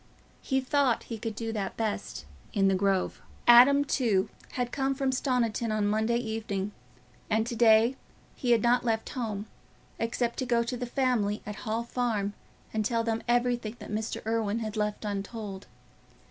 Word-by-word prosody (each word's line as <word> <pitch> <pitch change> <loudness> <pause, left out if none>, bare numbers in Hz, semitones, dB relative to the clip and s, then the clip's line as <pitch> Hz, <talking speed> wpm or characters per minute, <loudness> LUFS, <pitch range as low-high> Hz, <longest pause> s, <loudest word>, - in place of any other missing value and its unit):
He 265 -1 +1
thought 265 -2 +1
he 225 -2 -6
could 225 -1 -4
do 225 +1 -3
that 200 -3 -3
best 210 - -3 0.3
in 195 -1 +3
the 195 - +3
Grove. 190 0 0 0.2
Adam 265 +4 +8
too 215 -8 +1 0.2
had 245 -1 -2
come 270 -1 0
from 270 -1 0
Stoniton 245 -3 0
on 215 -1 +1
Monday 220 +3 +1
evening, 220 -4 -3 0.6
and 220 0 +2
to 235 0 -4
day 225 +2 +5 0.4
he 250 - -3
had 235 -3 +4
not 240 +1 +3
left 225 -2 -1
home, 215 -5 -3 0.5
except 235 +1 -1
to 260 - -1
go 235 -1 +3
to 235 +2 -3
the 245 0 -4
family 240 -5 0
at 210 - -4
the - - -9
Hall 225 0 -1
Farm 230 -4 -1 0.4
and 220 -1 0
tell 230 +1 +1
them 225 -1 -1
everything 240 -2 +1
that - - -9
Mr. 215 +1 -3
Irwine 225 0 0
had 215 0 -4
left 210 0 -2
untold. 200 -1 -5
225 Hz, 175 wpm, -29 LUFS, 210-245 Hz, 0.6 s, Adam